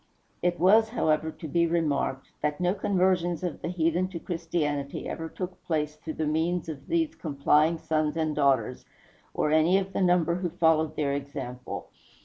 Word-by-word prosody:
It 175 Hz, 0 st, 0 dB
was, 215 Hz, +5 st, +5 dB
however, 160 Hz, -8 st, +1 dB
to 160 Hz, -, -9 dB
be 170 Hz, +3 st, +2 dB
remarked, 150 Hz, -5 st, -1 dB
that 150 Hz, 0 st, -1 dB
no 180 Hz, 0 st, +2 dB
conversions 185 Hz, -4 st, +1 dB
of 175 Hz, -3 st, -3 dB
the -, -, -3 dB
heathen 170 Hz, +1 st, +1 dB
to 185 Hz, -2 st, -6 dB
Christianity 160 Hz, -5 st, -2 dB
ever 165 Hz, 0 st, -5 dB
took 180 Hz, +1 st, -7 dB
place 150 Hz, -2 st, -1 dB
through 155 Hz, +1 st, -7 dB
the 155 Hz, -, -1 dB
means 160 Hz, +3 st, 0 dB
of 155 Hz, -4 st, -7 dB
these 330 Hz, -2 st, +1 dB
complying 150 Hz, +2 st, +2 dB
sons 155 Hz, -1 st, -1 dB
and 155 Hz, -2 st, 0 dB
daughters, 130 Hz, -4 st, +1 dB, 0.5 s
or 150 Hz, -, +1 dB
any 160 Hz, +4 st, +4 dB
of 195 Hz, 0 st, -3 dB
the -, -, -1 dB
number 175 Hz, -2 st, +3 dB
who 180 Hz, 0 st, -2 dB
followed 160 Hz, -2 st, +2 dB
their 145 Hz, -2 st, 0 dB
example. 135 Hz, -3 st, -6 dB
160 Hz, 170 wpm, -27 LUFS, 150-180 Hz, 0.5 s, was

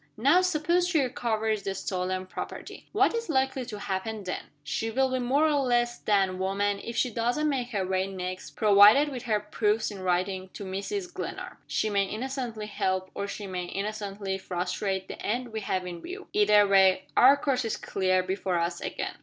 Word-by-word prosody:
Now 280 Hz, +11 st, +5 dB
suppose 350 Hz, 0 st, +1 dB
she 345 Hz, -3 st, +2 dB
recovers 220 Hz, -5 st, 0 dB
the 195 Hz, -1 st, -3 dB
stolen 185 Hz, 0 st, -2 dB
property. 185 Hz, -, -8 dB
What 395 Hz, +1 st, +3 dB
is 465 Hz, -3 st, -3 dB
likely 265 Hz, -2 st, +1 dB
to 215 Hz, -4 st, -6 dB
happen 205 Hz, +2 st, -3 dB
then? 185 Hz, -, -4 dB, 0.2 s
She 225 Hz, +10 st, -2 dB
will 260 Hz, +3 st, +1 dB
be 260 Hz, -, 0 dB
more 265 Hz, +5 st, +2 dB
or 300 Hz, -2 st, +3 dB
less 240 Hz, -2 st, +1 dB
than 195 Hz, -3 st, +1 dB
woman 200 Hz, +1 st, 0 dB
if 235 Hz, -, -5 dB
she 250 Hz, -, +1 dB
doesn't 240 Hz, +7 st, 0 dB
make 260 Hz, -4 st, -1 dB
her 200 Hz, -6 st, -1 dB
way 190 Hz, 0 st, 0 dB
next, 185 Hz, -1 st, -6 dB
provided 210 Hz, +7 st, +7 dB
with 260 Hz, -4 st, -5 dB
her 215 Hz, -3 st, +2 dB
proofs 210 Hz, +1 st, 0 dB
in 200 Hz, -, -8 dB
writing, 185 Hz, +1 st, -1 dB
to 200 Hz, -, -7 dB
Mrs. 345 Hz, -, -4 dB
Glenarm. -, -, -6 dB
She 215 Hz, -, 0 dB
may 200 Hz, -1 st, +2 dB
innocently 235 Hz, 0 st, -4 dB
help, 185 Hz, -2 st, -2 dB
or 200 Hz, -, -3 dB
she 200 Hz, +1 st, -6 dB
may 180 Hz, -2 st, -4 dB
innocently 200 Hz, 0 st, -4 dB
frustrate, 190 Hz, +1 st, -2 dB
the -, -, -8 dB
end 245 Hz, +3 st, -1 dB
we 220 Hz, -1 st, -4 dB
have 185 Hz, -3 st, -2 dB
in 175 Hz, -2 st, -6 dB
view 375 Hz, +2 st, -8 dB
either 210 Hz, 0 st, +5 dB
way, 190 Hz, -1 st, +5 dB
our 270 Hz, +3 st, +7 dB
course 270 Hz, -3 st, 0 dB
is 225 Hz, -, -2 dB
clear 185 Hz, -1 st, +1 dB
before 185 Hz, -1 st, -1 dB
us 170 Hz, +1 st, -1 dB
again. -, -, -4 dB
210 Hz, 190 wpm, -28 LUFS, 190-250 Hz, 0.2 s, provided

